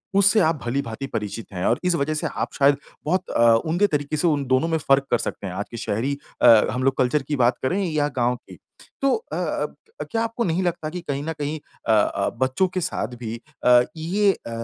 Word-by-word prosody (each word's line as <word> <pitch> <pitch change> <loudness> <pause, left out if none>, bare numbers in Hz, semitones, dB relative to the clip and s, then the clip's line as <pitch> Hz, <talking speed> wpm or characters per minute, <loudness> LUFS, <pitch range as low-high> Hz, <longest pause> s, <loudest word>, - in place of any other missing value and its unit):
उससे 200 +2 +5
आप 165 -4 +3
भली-भाँति 130 0 -3
परिचित 105 +1 -4
हैं, 90 0 -3
और 120 - +2
इस 180 -1 +3
वजह 145 0 0
से 155 - -1
आप - - -4
शायद 140 0 +5 0.3
बहुत 180 +4 0
अ, 115 - +2 0.2
उम्दे 175 +6 +2
तरीके 150 -3 -2
से 160 - +2
उन 145 -4 +1
दोनों 130 +5 +2
में 165 -1 +1
फ़र्क 135 -2 +2
कर 120 - +4
सकते 100 - -4
हैं, 90 - -5
आज 100 +3 -3
के 120 - -6
शहरी 120 +6 -2 0.2
अ, - - +6 0.2
हम 125 +3 -2
लोग 135 0 +2
कल्चर 130 +4 +2
की 150 - 0
बात 120 -2 +2
करें 185 +10 +1
या 150 -2 +1
गाँव 125 0 +1
की। - - -14 0.4
तो 275 0 +3 0.2
अ - - -2 0.3
अब - - -3
क्या 225 - 0
आपको 230 +1 -2
नहीं 180 -2 0
लगता 170 -3 -2
कि 180 +3 -5
कहीं 140 -4 -3
न 160 - -1
कहीं 150 0 -3 0.3
अ - - +6
अ, 105 -2 +2
बच्चों 130 +8 +2
के 185 - -1
साथ 165 -7 -3
भी 115 -1 -5 0.3
अ, 125 0 +7 0.2
ये 195 +6 +2
अ, - - -11
145 Hz, 230 wpm, -23 LUFS, 125-170 Hz, 0.4 s, अ